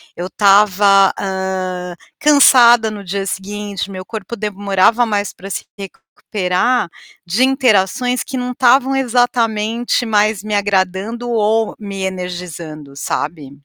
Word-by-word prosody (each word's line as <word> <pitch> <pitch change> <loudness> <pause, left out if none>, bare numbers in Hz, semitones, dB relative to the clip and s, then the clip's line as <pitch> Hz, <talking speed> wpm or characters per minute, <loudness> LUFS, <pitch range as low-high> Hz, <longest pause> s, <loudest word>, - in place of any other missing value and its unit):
eu 175 - -5
estava, 200 0 +4
hã, 185 -2 -4 0.2
cansada 245 -6 +6
no 205 -1 -8
dia 195 +1 -3
seguinte, 200 0 -5
meu 185 -1 -8
corpo 220 +2 -7
demorava 205 +3 +1
mais 205 -3 -2
para 195 - -11
se - - -5
recuperar 195 +2 -2 0.4
de 195 +9 +1
interações 250 -2 +1
que 265 - -6
não 250 0 -3
estavam 260 +2 +3
exatamente 240 -2 0
mais 210 -2 +1
me 210 0 -2
agradando 200 +4 -1
ou 220 -1 0
me 200 -2 -6
energizando, 175 -5 -6
sabe. 145 0 -4
205 Hz, 120 wpm, -17 LUFS, 190-235 Hz, 0.4 s, cansada